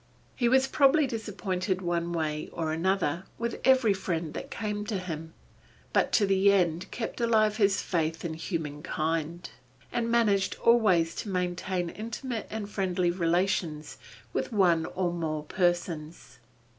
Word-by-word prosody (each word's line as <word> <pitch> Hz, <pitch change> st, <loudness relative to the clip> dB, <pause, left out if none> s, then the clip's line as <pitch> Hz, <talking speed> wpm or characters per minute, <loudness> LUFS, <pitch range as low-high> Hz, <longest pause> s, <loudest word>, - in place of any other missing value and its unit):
He 240 Hz, -2 st, +2 dB
was 265 Hz, +1 st, +5 dB
probably 285 Hz, +2 st, +4 dB
disappointed 195 Hz, -5 st, -2 dB
one 170 Hz, -1 st, -1 dB
way 155 Hz, -2 st, -2 dB
or 160 Hz, -2 st, -2 dB
another, 180 Hz, 0 st, 0 dB
with 235 Hz, 0 st, -3 dB
every 260 Hz, -5 st, +5 dB
friend 170 Hz, -4 st, -3 dB
that -, -, -6 dB
came 210 Hz, -1 st, -3 dB
to 210 Hz, -2 st, -2 dB
him, 165 Hz, -3 st, -6 dB, 0.6 s
but -, -, +2 dB
to 210 Hz, -, +4 dB
the 195 Hz, 0 st, +4 dB
end 175 Hz, -2 st, +1 dB
kept 235 Hz, +1 st, -5 dB
alive 215 Hz, -2 st, +3 dB
his 200 Hz, -3 st, +2 dB
faith 165 Hz, -1 st, -1 dB
in 165 Hz, -, -2 dB
humankind, 160 Hz, +1 st, -3 dB, 0.4 s
and 230 Hz, -1 st, -1 dB
managed 210 Hz, -5 st, +2 dB
always 190 Hz, -8 st, +4 dB
to 210 Hz, -, -4 dB
maintain 180 Hz, -1 st, -2 dB
intimate 230 Hz, +1 st, -5 dB
and 215 Hz, -1 st, -4 dB
friendly 185 Hz, -3 st, 0 dB
relations 170 Hz, -3 st, -1 dB, 0.3 s
with -, -, -2 dB
one 175 Hz, -6 st, +3 dB
or 180 Hz, -2 st, -1 dB
more 155 Hz, -3 st, -2 dB
persons. 170 Hz, -5 st, -2 dB
185 Hz, 140 wpm, -28 LUFS, 165-215 Hz, 0.6 s, was